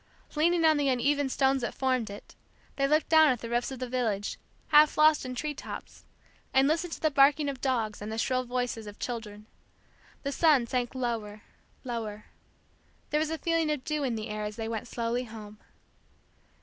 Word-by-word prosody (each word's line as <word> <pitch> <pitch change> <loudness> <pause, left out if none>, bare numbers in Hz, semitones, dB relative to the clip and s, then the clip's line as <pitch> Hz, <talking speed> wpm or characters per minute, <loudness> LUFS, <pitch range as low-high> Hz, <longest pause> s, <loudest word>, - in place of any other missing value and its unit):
Leaning 330 +2 +3
on 315 -1 +5
the 285 -1 +1
uneven 275 +2 +1
stones 270 0 +2
that 235 - -3
formed 255 -4 0
it, 200 - -10 0.4
they 275 0 +1
looked 305 +2 +2
down 315 -1 +6
at 255 -5 +2
the 230 - -6
roofs 240 +1 0
of 265 - -6
the 255 0 -4
village, 225 -5 -2 0.3
half 300 0 +6
lost 305 -3 +5
in 255 - -5
tree 300 +4 -3
tops; 290 - -9 0.5
and 265 +1 +5
listened 330 +3 0
to - - -5
the 310 - +1
barking 285 +2 +4
of 275 -3 -4
dogs, 230 -6 -1
and 210 +1 -5
the 220 - -4
shrill 255 +2 0
voices 245 -3 -3
of 205 - -9
children. 215 -3 -6 0.8
The 280 - -2
sun 290 -4 +4
sank 245 +1 -2
lower, 225 -4 -3 0.4
lower. 220 -4 -5 0.9
There 300 - +2
was 310 0 0
a 320 - -2
feeling 330 -1 0
of 295 -4 -2
dew 305 0 -2
in 250 -4 -1
the 220 0 -5
air 210 0 -4
as 210 0 -4
they 225 -1 -4
went 225 0 -4
slowly 240 +1 -2
home. 215 -2 -11
255 Hz, 195 wpm, -29 LUFS, 225-295 Hz, 0.9 s, down